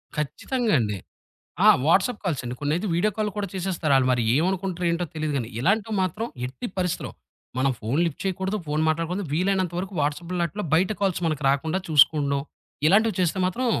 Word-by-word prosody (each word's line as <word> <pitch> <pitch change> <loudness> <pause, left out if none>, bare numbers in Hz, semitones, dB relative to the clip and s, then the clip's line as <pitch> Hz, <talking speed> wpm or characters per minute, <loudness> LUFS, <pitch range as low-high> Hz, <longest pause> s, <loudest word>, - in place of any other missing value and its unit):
ఖచ్చితంగా 220 - -1
అండి. 105 -3 -1 0.7
ఆ! - - +9 0.2
వాట్సాప్ 195 +7 +3
కాల్స్ 160 -8 -1
అండి. 120 +1 -4
కొన్నైతే 160 +8 0
వీడియో 195 +5 +2
కాల్లు 210 -1 -1
కూడా 200 -2 -2
చేసేస్తారు. 180 -5 -1
ఆళ్ళు 130 -1 +3
మరి 120 -2 +1
ఏమనుకుంటారో, 180 +1 0
ఏంటో 175 +1 -1
తెలీదు 155 -1 -1
గాని, 120 -3 -2
ఇలాంటివి 210 - +1
మాత్రం 185 +5 -2 0.2
ఎట్టి 125 -1 -6
పరిస్థితిలో, 180 -2 -1 0.5
మనం 135 0 +2
ఫోన్ 120 +8 0
లిఫ్ట్ 165 - -5
చేయకూడదు. 190 +2 -1
ఫోన్ 150 +1 0
మాట్లాడకూడదు. 165 +5 -1
వీలైనంత 185 0 +1
వరకు 190 +2 -5
వాట్సాప్‌లో 170 +5 -2
ఆటిల్లో 205 +5 -5
బయట 185 +5 +3
కాల్స్ 190 -3 +1
మనకు 155 -2 -3
రాకుండా 160 +6 0
చూసుకోవడం, 145 -2 +4 0.5
ఇలాంటివి 215 +2 +4
చేస్తే 180 +1 +1
మాత్రం 245 +8 -1
175 Hz, 170 wpm, -25 LUFS, 150-195 Hz, 0.7 s, ఆ